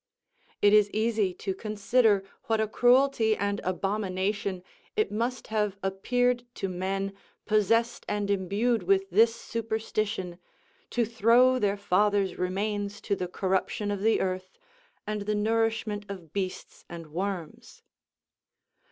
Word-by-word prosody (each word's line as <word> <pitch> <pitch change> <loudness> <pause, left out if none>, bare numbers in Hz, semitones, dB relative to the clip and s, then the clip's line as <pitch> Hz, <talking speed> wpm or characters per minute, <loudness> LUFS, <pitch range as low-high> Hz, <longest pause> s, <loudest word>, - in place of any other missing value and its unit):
It 205 0 +6
is 210 -1 +6
easy 215 -2 +1
to 195 - -3
consider 215 +1 +2 0.2
what 225 -1 +1
a 220 - +1
cruelty 245 -1 +3
and 200 0 -1
abomination 195 0 -2 0.3
it 430 - +1
must 235 +4 -2
have 210 -2 0
appeared 245 +6 +1
to 195 - -2
men 195 +2 -2 0.3
possessed 230 +3 +2
and 205 -1 -1
imbued 200 +5 +1
with 195 +1 +1
this 225 +4 +5
snperstition 215 -5 -3 0.5
to 240 -1 +1
throw 235 +3 +4
their 205 -2 +1
fathers' 200 -1 +1
remains 205 +2 -2
to 200 - -1
the 180 -2 -3
corruption 190 +3 -1
of 200 -1 -3
the 220 +2 +3
earth, 185 0 -3 0.5
and 210 -1 -3
the 210 - +1
nourishment 220 -1 0
of 175 -6 -9
beasts 190 -2 -5
and 165 -3 -9
worms. 185 -3 -5
205 Hz, 125 wpm, -28 LUFS, 195-225 Hz, 0.5 s, It